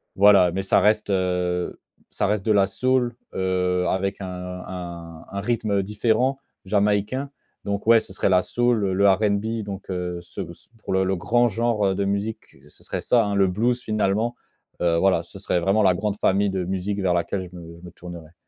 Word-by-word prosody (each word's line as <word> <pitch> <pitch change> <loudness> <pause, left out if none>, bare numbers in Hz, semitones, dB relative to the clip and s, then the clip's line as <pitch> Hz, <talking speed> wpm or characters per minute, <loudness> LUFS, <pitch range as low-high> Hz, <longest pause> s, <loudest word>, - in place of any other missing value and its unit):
voilà 100 -3 +6
mais 95 +3 -2
ça 95 - +3
reste 105 -1 +2
heu, 90 -1 -1 0.3
ça - - -2
reste 105 -1 0
de 110 - +2
la 100 -1 +4
soul 125 +4 0 0.2
heu, 90 -1 0
avec 95 +1 -1
un - - -4 0.4
un 85 -3 -8
un 100 - -3
rythme 115 -1 -1
heu, - - 0
différent, 115 +6 +1 0.3
jamaïcain. 105 +6 0 0.4
Donc 100 0 -2
ouais, 115 -1 +7
ce 95 - -11
serait 95 - 0
la 90 -1 +4
soul, 120 -5 +1
le 100 +1 +4
RNB. 105 +3 0
Donc 100 -1 -7
heu, 90 -1 -3
ce - - -7
ce - - -21
pour - - -4
le 95 0 +3
le 95 +1 0
grand 120 +6 +2
genre 105 -3 +1
de 100 +1 -1
musique, 100 +3 -3
ce - - -22
serait - - -4
ça 120 -3 +3
hein, 100 -1 -1
le 95 -1 +4
blues, 120 +6 0
finalement 110 +2 0 0.5
heu, 85 -1 +2
voilà 95 -2 +3
ce 100 - -13
serait 90 -2 0
vraiment 100 +5 +2
la 95 - +5
grande 105 +2 -2
famille 100 0 +2
de 95 -1 -2
musique 95 +2 -2
vers 90 -2 +2
laquelle 90 +1 -2
je - - -13
me 85 -1 -11
je - - -19
me 85 - -10
tournerais. 85 -2 -11
100 Hz, 200 wpm, -23 LUFS, 90-105 Hz, 0.5 s, ouais